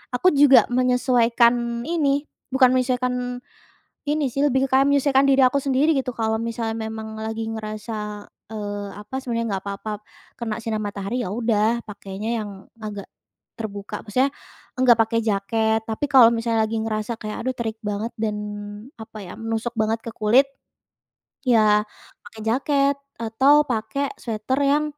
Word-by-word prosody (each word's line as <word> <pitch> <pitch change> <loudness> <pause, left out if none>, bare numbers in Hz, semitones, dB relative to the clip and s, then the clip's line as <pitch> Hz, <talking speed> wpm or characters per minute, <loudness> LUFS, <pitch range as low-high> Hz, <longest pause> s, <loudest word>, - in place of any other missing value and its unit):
aku 365 - +2
juga 270 -3 +9
menyesuaikan 240 -1 +2
ini, 290 -4 +1 0.3
bukan 260 -1 +5
menyesuaikan 255 0 +1 0.9
ini 300 0 +1
sih, 275 - -7
lebih 265 0 +1
kayak 270 +1 +4
menyesuaikan 280 -1 +3
diri 270 -1 +4
aku 255 +2 +4
sendiri 275 +3 +2
gitu 250 -2 -3
kalau 220 -1 0
misalnya 230 -1 -3
memang 220 0 -6
lagi 220 +1 -4
ngerasa, 215 -1 -5 0.3
eee, 205 -1 -4
apa 210 +5 -10
sebenarnya 230 -3 -2
enggak 195 -1 -2
apa-apa 200 +2 -5 0.5
kena 225 -1 -4
sinar 220 -1 -2
matahari, 205 +3 -3
ya - - -3
udah 225 0 +1
pakainya 200 0 -7
yang 210 -1 -4 0.3
agak 210 -2 -7 0.5
terbuka 205 -2 -6
maksudnya, 260 +6 +2 0.5
enggak 250 -2 +6
pakai 225 +1 +2
jaket. 220 +2 +1
Tapi 220 +6 -2
kalo 260 -5 +7
misalnya 230 -1 +1
lagi 225 - -1
ngerasa 220 +1 -3
kayak 215 0 -5
aduh 260 +1 -2
terik 225 -1 -3
banget 210 +2 -3
dan 215 -1 -2 0.6
apa 220 0 -9
ya 175 - -8
menusuk 225 +1 -3
banget 220 0 0
ke - - -3
kulit 235 +6 +4 1.0
ya 215 -3 +4 0.4
pakai 220 +1 -12
jaket 275 +4 +2 0.3
atau 270 +7 +4
pakai 270 +5 -2
sweater 230 +3 -2
yang, 295 +2 +3
230 Hz, 145 wpm, -23 LUFS, 215-255 Hz, 1.0 s, juga